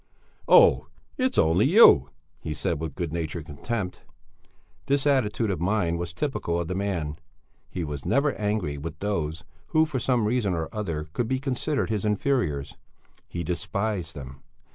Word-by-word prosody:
"Oh, - - +6 0.3
it's 255 -1 0
only 85 +9 +4
you?" 115 - +7 0.3
he 75 -1 -5
said - - -1
with 80 -3 -5
good 85 -4 -3
natured 80 -1 -3
contempt. 90 +6 -4 0.9
This 140 0 +1
attitude 120 -6 +2
of 90 - -3
mind 90 -3 +1
was 85 -1 -3
typical 85 - -2
of 85 - -3
the 90 - -2
man; 90 -6 -2 0.5
he 90 - -4
was 75 -3 -5
never 140 +1 +2
angry 105 -9 -2
with 80 +2 -6
those 85 -4 -2 0.2
who 160 -1 +3
for 150 -4 -3
some 120 -2 +1
reason 105 -5 +1
or 80 -1 -3
other 85 -8 -3
could 120 - -1
be 130 +2 0
considered 135 -1 -1
his 105 -3 -1
inferiors; 105 - 0 0.5
he 85 - -4
despised 90 +1 -2
them. 70 -1 -9
95 Hz, 160 wpm, -26 LUFS, 80-120 Hz, 0.9 s, you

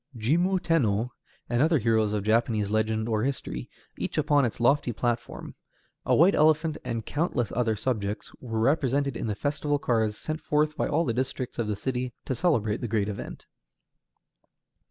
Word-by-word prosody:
Jimmu 170 - +2
Tenno 120 - +1 0.4
and 120 +1 +1
other 160 +2 +4
heroes 110 -3 +2
of 105 -2 -1
Japanese 110 -1 +1
legend 110 0 0
or 110 -2 0
history, 120 - -3 0.3
each - - -3
upon 145 -2 +3
its 115 - -3
lofty 125 +1 +3
platform, 120 +1 -3 0.5
a - - +4
white 180 +6 +6
elephant, 155 +1 +3
and 115 -2 -3
countless 145 - -1
other 115 -2 +1
subjects 105 -3 -3
were 115 -3 -4
represented 140 0 +1
in 115 - -3
the 105 - -1
festival 145 +4 -1
cars 110 -6 0
sent 155 +1 -4
forth 150 0 +1
by - - 0
all 165 +3 +1
the 115 - 0
districts 125 0 -3
of 115 - 0
the 105 - -1
city 125 +2 -3
to - - -1
celebrate 115 - +1
the 120 - -2
great 105 -2 0
event. 100 - -7
120 Hz, 170 wpm, -27 LUFS, 110-145 Hz, 0.5 s, white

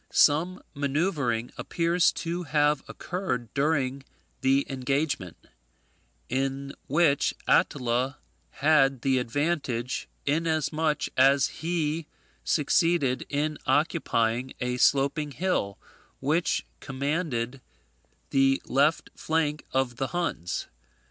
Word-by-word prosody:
Some 170 +5 +3
manoeuvring 140 -5 -1
appears 170 +1 +2
to 170 +2 -3
have 150 -2 +2
occurred 140 - -4
before 140 -2 +1 0.4
the 135 +1 +3
engagement, 135 - -2 0.9
in 135 +1 -2
which 150 0 +2
Attila 130 -3 +2 0.3
had 135 -4 +3
the 135 -1 +3
advantage, 125 -2 -2 0.2
inasmuch 155 0 0
as 135 +1 +5
he 160 -1 -1 0.4
succeeded 150 -3 +2
in 150 +1 -1
occupying 130 -4 +1
a 125 0 -1
sloping 140 +3 +2
hill, 145 - -1 0.4
which 155 +5 0
commanded 135 -3 -2 0.7
the 135 0 +3
left 145 +4 +1
flank 155 -2 -1
of 130 -2 0
the 135 - -1
Huns. 165 - -2
140 Hz, 90 wpm, -27 LUFS, 130-160 Hz, 0.9 s, as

